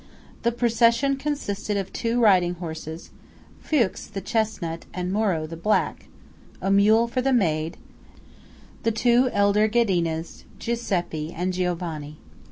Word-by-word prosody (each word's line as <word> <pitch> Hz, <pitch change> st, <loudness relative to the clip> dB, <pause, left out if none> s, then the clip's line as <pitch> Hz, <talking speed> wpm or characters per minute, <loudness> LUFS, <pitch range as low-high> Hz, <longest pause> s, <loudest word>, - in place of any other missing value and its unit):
The 235 Hz, -, +2 dB
procession 235 Hz, +3 st, +3 dB
consisted 215 Hz, -8 st, -3 dB
of 195 Hz, -1 st, -4 dB
two 235 Hz, +1 st, 0 dB
riding 185 Hz, -6 st, +4 dB
horses 160 Hz, -1 st, -7 dB, 0.5 s
(Fuchs, 245 Hz, -11 st, 0 dB
the 195 Hz, -, -5 dB
chesnut, 200 Hz, -6 st, -2 dB
and 180 Hz, 0 st, -2 dB
Moro, 195 Hz, -7 st, +1 dB
the 165 Hz, +1 st, -7 dB
black), 210 Hz, +6 st, 0 dB, 0.5 s
a 195 Hz, +1 st, -1 dB
mule 215 Hz, +4 st, +5 dB
for 255 Hz, +2 st, -1 dB
the 270 Hz, +1 st, +1 dB
maid, 165 Hz, -9 st, +1 dB, 1.0 s
the 230 Hz, -, +1 dB
two 240 Hz, +3 st, +3 dB
elder 205 Hz, +1 st, +3 dB
Ghedinas, 175 Hz, -8 st, 0 dB
Giuseppe, 175 Hz, -9 st, -2 dB
and 180 Hz, +2 st, -2 dB
Giovanni. 170 Hz, -5 st, -3 dB
200 Hz, 125 wpm, -24 LUFS, 170-230 Hz, 1.0 s, mule